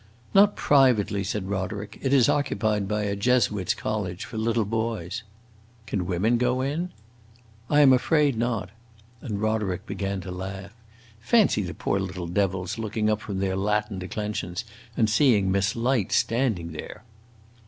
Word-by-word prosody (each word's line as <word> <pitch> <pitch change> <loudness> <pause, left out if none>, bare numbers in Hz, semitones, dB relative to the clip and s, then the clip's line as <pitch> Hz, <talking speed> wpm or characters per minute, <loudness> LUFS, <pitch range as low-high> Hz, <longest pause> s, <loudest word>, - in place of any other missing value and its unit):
"Not 205 +1 +6
privately," 125 -8 +3
said 100 0 -3
Roderick. 100 +1 -4
"It 135 - -1
is 135 -4 +5
occupied 105 -7 0
by 105 +1 -1
a 100 -1 -1
Jesuits' 105 -3 +1
college, 100 -3 -3
for 115 - -10
little 115 0 +1
boys." 110 -4 -2 0.6
"Can 95 -5 -2
women 105 +7 +1
go 125 +1 +1
in?" 150 +7 -2 0.8
"I 150 0 +5
am 135 -2 +7
afraid 145 +1 +3
not." 110 -5 -2 0.5
And 105 -7 -4
Roderick 105 -3 -1
began 100 -3 -3
to 90 +1 -7
laugh. 95 +2 -6 0.5
"Fancy 190 - +3
the 90 -3 -5
poor 100 - -1
little 95 -2 -4
devils 95 +3 -1
looking 110 0 0
up 105 0 -1
from 100 -3 -5
their 95 -1 0
Latin 105 0 -1
declensions 105 +1 -4 0.3
and 110 - +3
seeing 105 -4 +3
Miss 100 +1 +1
Light 120 -3 0
standing 115 -9 +1
there!" 80 - -8
105 Hz, 150 wpm, -25 LUFS, 95-120 Hz, 0.8 s, am